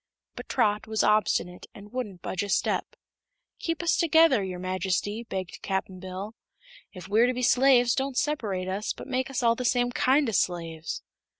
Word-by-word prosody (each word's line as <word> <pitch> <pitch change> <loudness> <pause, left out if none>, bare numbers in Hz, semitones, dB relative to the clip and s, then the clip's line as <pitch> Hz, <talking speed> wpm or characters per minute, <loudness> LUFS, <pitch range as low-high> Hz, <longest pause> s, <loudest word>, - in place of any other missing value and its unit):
But - - -9
Trot 210 +1 +1
was 220 0 0
obstinate 195 -4 +1
and 205 +1 -12
wouldn't 210 -9 -5
budge 185 - -2
a 205 - -4
step. - - 0 0.6
"Keep 330 0 -2
us 340 - +2
together, 320 -8 +4
your 185 -1 -4
Majesty," 185 +4 -2
begged 190 -6 -6
Cap'n 190 -1 -3
Bill. 190 +3 -6 0.6
"If 185 -2 -10
we're 220 +4 +4
to 250 - -1
be 250 - -3
slaves, 245 -1 +5
don't 270 -1 -2
separate 210 -11 -1
us, 195 +3 -2
but - - -10
make 260 0 -2
us 260 -2 -2
all 230 -1 +5
the 250 - -4
same 245 0 +2
kind 270 +3 +3
o' - - 0
slaves." 165 -4 -2
215 Hz, 180 wpm, -27 LUFS, 185-255 Hz, 0.6 s, slaves